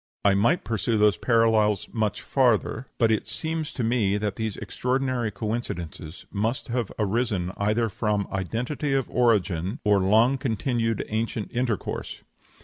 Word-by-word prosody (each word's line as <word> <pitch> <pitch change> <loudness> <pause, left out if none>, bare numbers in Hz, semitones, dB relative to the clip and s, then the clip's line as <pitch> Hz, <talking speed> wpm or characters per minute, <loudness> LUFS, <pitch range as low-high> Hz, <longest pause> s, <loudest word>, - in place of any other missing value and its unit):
I 100 - +6
might 115 - +2
pursue 110 0 0
those 105 -1 +4
parallels 110 -3 +3
much 110 -4 -1
farther; 125 -1 +1
but 115 -2 +3
it 110 -2 0
seems 160 +6 -3
to 125 - -3
me 110 -4 +2
that 105 -1 -2
these 110 -3 -3
extraordinary 130 -2 -1
coincidences 95 -7 -5
must 115 +6 -2
have 120 -3 -1
arisen 105 -4 0
either 105 +3 +1
from 105 -1 -1
identity 125 - -2
of 135 -2 +1
origin 100 - +1
or 105 -2 +4
long 110 +8 +4
continued 115 -2 -1
ancient 110 0 -2
intercourse. 120 -4 -3
110 Hz, 140 wpm, -25 LUFS, 105-120 Hz, -, I